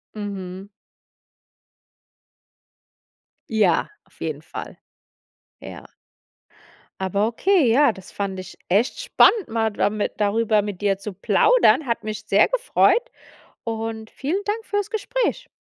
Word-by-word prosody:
Mhm. 195 -2 -6 2.8
Ja, 210 -7 +2 0.2
auf - - -28
jeden - - -3
Fall. - - -8 0.8
Ja. - - -10 1.1
Aber 200 +3 +1
okay, 320 - +2
ja, 280 0 +5
das 190 -3 -13
fand 195 -2 -3
ich 185 -1 -10
echt 225 - +1
spannend, 470 -4 +4
mal 225 -1 0
dami 205 0 0
darüber 215 +1 +2
mit 205 -3 -6
dir 195 -2 +1
zu 205 +2 -7
plaudern. 315 - +3
Hat 235 -2 -2
mich 215 -1 -5
sehr 205 0 +4
gefreut. - - +2 0.5
Und 225 -1 -4
vielen 350 +9 -3
Dank 440 +2 -2
fürs 410 0 -2
Gespräch. 480 +3 -2
220 Hz, 115 wpm, -22 LUFS, 200-330 Hz, 2.8 s, ja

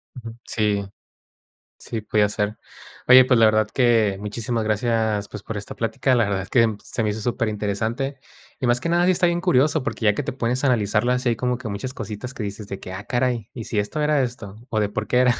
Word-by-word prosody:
Ujú. 115 -2 -8
Sí. 105 -2 0 1.0
Sí, 115 -2 -4
podía 105 0 +2
ser. 105 +1 -2 0.5
Oye, 130 0 +9
pues 125 -2 +3
la 115 - +7
verdad 110 0 +3
que 115 -6 +3
muchísimas 110 +2 -2
gracias, 110 -1 0
pues, 105 -1 -8
por 110 - -6
esta 105 - -6
plática. 125 +3 0
La 120 -3 +3
verdad 100 -1 -1
es 95 - -11
que 115 -3 +3
se 115 - -2
me 110 - 0
hizo 105 +1 -3
superinteresante. 115 +4 -2 0.4
Y 130 - 0
más 120 0 +2
que 170 - -1
nada, 175 +1 +3
sí 185 - +5
está 175 - +2
bien 170 0 0
curioso, 150 -4 +2
porque 130 - -4
ya 105 -1 +4
que 145 - -2
te 130 - -4
pones 125 +1 -1
a - - +2
analizarlas, 120 +1 +1
hay 120 -2 +2
como 125 +1 0
que 120 -2 -7
muchas 125 +6 -5
cositas 110 +3 -6
que - - -5
dices 100 0 -6
de 100 - -6
que: 95 - -8
"Ah, 95 +2 -7
caray, 120 -3 -1
¿y 115 - -6
si 105 - -3
esto 105 +9 -1
era 150 -2 +3
esto? 115 -5 -5
¿O 110 - -1
de 105 -1 +1
por 110 +1 -3
qué 125 - +2
era 125 -1 +4
115 Hz, 235 wpm, -23 LUFS, 105-125 Hz, 1.0 s, Oye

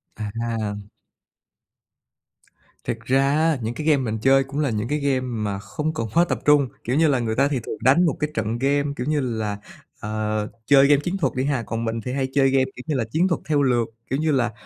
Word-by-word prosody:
À. 110 0 -3 2.1
Thiệt 115 - -3
ra 130 +3 +1
á, 160 -1 +2
những 115 +1 -3
cái 155 +4 -5
game 150 - +5
mình 115 -5 -2
chơi 135 +2 +4
cũng 135 +2 -5
là 145 - +1
những 110 0 -2
cái 150 +2 -1
game 140 -2 +1
mà 110 -6 -3
không 155 +8 -4
cần 115 -7 -3
quá 170 +1 +4
tập - - -1
trung. 145 -2 +5 0.2
Kiểu 125 - -1
như 160 +2 +4
là, 140 -4 +2
người 110 -2 -2
ta 135 +3 +3
thì 140 -3 -1
thường 110 - -5
đánh 140 +8 +4
một 155 - +1
cái 150 - -1
trận 110 -1 -2
game, 140 +1 +2
kiểu 125 0 -4
như 150 -1 +1
là 110 -5 -2 0.4
ờ, 110 0 -2 0.2
chơi 140 -1 +6
game 145 -1 +4
chiến 180 +5 -2
thuật 145 -9 0
đi 130 - 0
ha, 140 -4 0
còn 115 +1 -4
mình 115 0 -2
thì 125 - -5
hay 135 -1 -1
chơi 135 -1 +4
game, 135 0 +3
kiểu 125 - -9
như 155 - 0
là, 125 - +1
chiến 170 +6 +2
thuật 170 - -1
theo 150 -2 +1
lượt. 120 -3 +2 0.2
Kiểu 135 - -1
như 155 0 +1
là, 120 -4 +1
130 Hz, 240 wpm, -23 LUFS, 115-145 Hz, 2.1 s, chơi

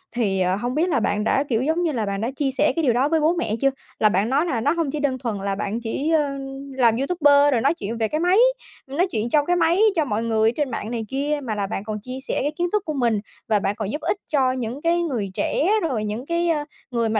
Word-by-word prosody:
thì, 200 -5 0
ờ, 180 0 +2
hông 245 +5 -3
biết 340 +4 +1
là 280 - +2
bạn 210 -1 0
đã, 270 - +2
kiểu 230 -2 +1
giống 320 +6 0
như 330 - +1
là, 230 -6 -1
bạn 200 0 -3
đã 235 +4 -1
chia 275 -1 0
sẻ 295 +3 +2
cái 330 - 0
điều 250 -5 +3
đó 260 +5 +2
với 325 - +2
bố 315 +3 +2
mẹ 225 -10 -1
chưa, 275 - +4 0.3
là 215 - +5
bạn 205 +4 +1
nói 290 +6 +2
là 250 -9 -1
nó - - +2
hông 330 -4 -1
chỉ 300 - -3
đơn 275 -3 0
thuần 230 -5 -3
là 195 0 -2
bạn 210 +3 -3
chỉ, 255 +6 -2
ơ, 290 -3 +1 0.4
làm 235 -3 +4
YouTuber 290 -1 +4
rồi 235 - +2
nói 280 +6 +3
chuyện 225 -5 -5
về 220 -1 +1
cái 305 - -2
máy, 360 +3 +3 0.5
nói 325 +8 0
chuyện 225 +1 -1
trong 295 +1 +3
cái 355 - +2
máy 340 +2 +2 0.2
cho 315 - +2
mọi 225 -3 -1
người 220 -1 +2
ở - - 0
trên 290 -4 -1
mạng 220 - -4
này 230 -2 -3
kia, 290 +2 -1
mà 225 -4 -3
là 200 -1 -2
bạn 195 - -4
còn 215 0 -4
chia 255 +3 -7
sẻ - - -1
cái 290 +2 0
kiến 350 0 +1
thức 420 -2 0
của 310 - -3
mình 235 -6 +1 0.3
và 215 -2 +2
bạn 200 +1 -1
còn 210 -1 -4
giúp 300 - -4
ích 340 +5 0
cho 265 -4 +2
những 255 +1 -4
cái 340 +1 +2
người 240 - -2
trẻ, 320 - 0
rồi 250 -10 -1
những 215 +5 -4
cái, 340 +2 0
ơ, 300 -3 0 0.3
người 230 -2 0
mà 220 -1 +1
260 Hz, 290 wpm, -23 LUFS, 220-305 Hz, 0.5 s, là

